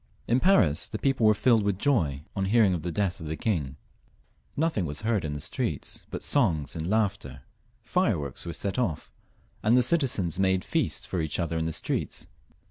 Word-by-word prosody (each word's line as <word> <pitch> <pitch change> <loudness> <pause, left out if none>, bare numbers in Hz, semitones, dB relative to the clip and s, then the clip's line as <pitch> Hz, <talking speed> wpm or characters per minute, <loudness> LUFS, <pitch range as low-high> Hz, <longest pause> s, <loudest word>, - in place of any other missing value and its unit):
In 120 +2 +3
Paris, 95 - +3
the 110 - -5
people 130 -3 +2
were 110 - +5
filled 115 +1 +4
with 100 -2 0
joy 80 - +1
on 95 -1 0
hearing 105 -1 +4
of 85 - -2
the 85 +2 -3
death 100 0 -1
of 80 - -7
the 80 +1 -3
king; 80 - -1 0.8
nothing 150 - 0
was 75 0 -6
heard 110 -5 +1
in 75 -2 -3
the 75 - -4
streets - - -3
but - - -6
songs 85 - +1
and 80 +2 -3
laughter, 105 -2 -1 0.4
fireworks 110 - -1
were 85 - -5
let 100 +5 -1
off, 90 -12 -2 0.5
and 115 +4 +4
the - - +6
citi 140 +3 +2
zens 90 -7 -2
made 95 -1 +2
feasts - - -1
for 90 - -2
each 80 +1 -2
other 85 -1 -1
in 80 0 0
the 80 - -1
streets. - - -3
95 Hz, 200 wpm, -27 LUFS, 80-115 Hz, 0.8 s, the